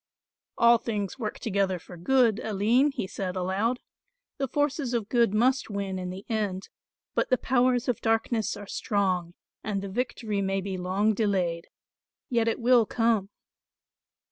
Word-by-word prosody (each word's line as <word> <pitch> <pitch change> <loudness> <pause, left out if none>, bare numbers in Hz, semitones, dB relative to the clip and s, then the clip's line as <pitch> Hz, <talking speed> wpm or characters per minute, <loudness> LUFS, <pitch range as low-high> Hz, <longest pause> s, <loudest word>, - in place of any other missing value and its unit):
"All 235 0 +6
things 210 +1 -3
work 215 -3 -3
together 195 -3 0
for 175 +1 -12
good, 230 +4 +3
Aline," 220 +6 +2
he - - -3
said 185 -1 -4
aloud, 195 +7 0 0.6
"the 270 - 0
forces 285 -2 0
of 220 -3 -2
good 235 -4 +3
must 250 +5 +2
win 200 -2 -3
in 180 0 -4
the 185 +2 -8
end, 205 -4 -2 0.4
but - - 0
the 255 - +4
powers 250 -1 +2
of 245 - -1
darkness 225 -1 0
are 205 - -8
strong 185 -4 -1 0.3
and 200 -2 -2
the 200 - -5
victory 215 -1 -2
may 195 0 0
be 190 0 -4
long 190 +4 +1
delayed; 185 -6 0 0.6
yet 230 -2 +2
it 225 - 0
will 240 -2 +4
come." 225 -4 +1
215 Hz, 155 wpm, -27 LUFS, 195-235 Hz, 0.6 s, All